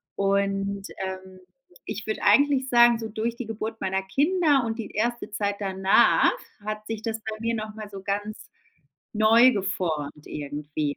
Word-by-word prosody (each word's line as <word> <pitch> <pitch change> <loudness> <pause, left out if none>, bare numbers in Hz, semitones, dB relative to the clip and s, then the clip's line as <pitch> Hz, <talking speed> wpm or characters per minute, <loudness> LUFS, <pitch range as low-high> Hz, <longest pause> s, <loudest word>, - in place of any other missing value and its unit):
Und, 195 0 0 0.2
ähm, 190 0 -8 0.5
ich 210 +1 -5
würd 215 - -2
eigentlich 275 -2 +4
sagen, 240 -1 +6
so 225 - -4
durch 225 +2 -3
die 245 -1 -6
Geburt 225 0 -5
meiner 190 0 -1
Kinder 290 - +2
und 225 0 -3
die 220 - -5
erste 235 +1 -2
Zeit 205 -1 -1
danach 190 -1 +4 0.3
hat 215 0 -5
sich 225 -1 -4
das 225 -1 -3
bei 215 0 -5
mir 230 +1 -1
noch 215 -1 -5
mal 215 -1 -8
so 195 -1 -9
ganz 205 +2 -4 0.6
neu 225 +4 +6
geformt 170 -8 -3
irgendwie. 145 0 -4
215 Hz, 160 wpm, -25 LUFS, 195-230 Hz, 0.6 s, sagen